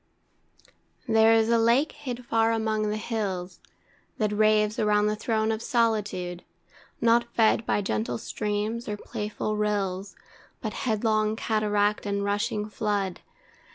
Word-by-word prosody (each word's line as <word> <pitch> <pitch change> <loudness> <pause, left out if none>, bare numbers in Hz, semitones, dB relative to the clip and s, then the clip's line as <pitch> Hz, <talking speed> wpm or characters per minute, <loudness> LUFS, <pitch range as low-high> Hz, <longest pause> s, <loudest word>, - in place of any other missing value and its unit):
There 220 0 +5
is 225 0 +4
a 235 0 +4
lake 235 +7 +3
hid 250 -4 -7
far 225 -1 +2
among 220 -1 0
the 210 - -1
hills, 195 -5 -3 0.6
That 215 -2 0
raves 215 0 +2
around 210 -1 +3
the 210 0 +1
throne 220 0 0
of 220 0 -2
solitude, 210 -7 0 0.6
Not 235 0 +4
fed 225 0 +3
by 205 - +1
gentle 115 - -1
streams, 210 - -3
or 210 - -3
playful 210 +1 -4
rills, 200 -2 -1 0.4
But - - -4 0.2
headlong 215 0 +1
cataract 210 -2 0
and 200 0 -1
rushing 210 +1 -1
flood. 205 -3 -2
215 Hz, 130 wpm, -26 LUFS, 205-225 Hz, 0.6 s, There